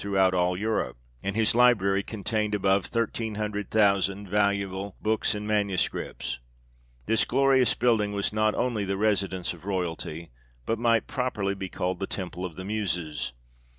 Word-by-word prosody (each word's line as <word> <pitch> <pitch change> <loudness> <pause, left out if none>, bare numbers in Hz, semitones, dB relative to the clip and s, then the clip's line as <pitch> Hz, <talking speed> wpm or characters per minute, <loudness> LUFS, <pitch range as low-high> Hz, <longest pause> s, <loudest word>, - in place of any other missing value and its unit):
throughout 95 -2 +2
all 90 0 +1
Europe; 110 - -1 0.2
and 100 0 -3
his 110 -1 +3
library 105 -5 +4
contained 105 0 -2
above 95 -1 +2
thirteen 115 -1 -2
hundred 105 -1 -3
thousand 100 -1 +2
valuable 100 -1 0
books 110 -1 +1
and 105 0 -4
manu 105 -3 +1
scripts. - - -2 0.7
This 115 - +3
glorious 130 -2 +3
building 115 -4 +2
was 100 0 -1
not 110 0 +2
only 120 -5 0
the 95 0 -2
residence 100 -4 0
of 85 - -14
royalty, 85 -4 -3 0.3
but 115 - -1
might 115 -1 +3
properly 105 -7 -1
be 95 -1 -5
called 90 0 -2
the 95 - -2
Temple 90 -2 -5
of 90 -4 -5
the 95 - -7
Muses. 90 - -2
100 Hz, 155 wpm, -27 LUFS, 95-110 Hz, 0.7 s, library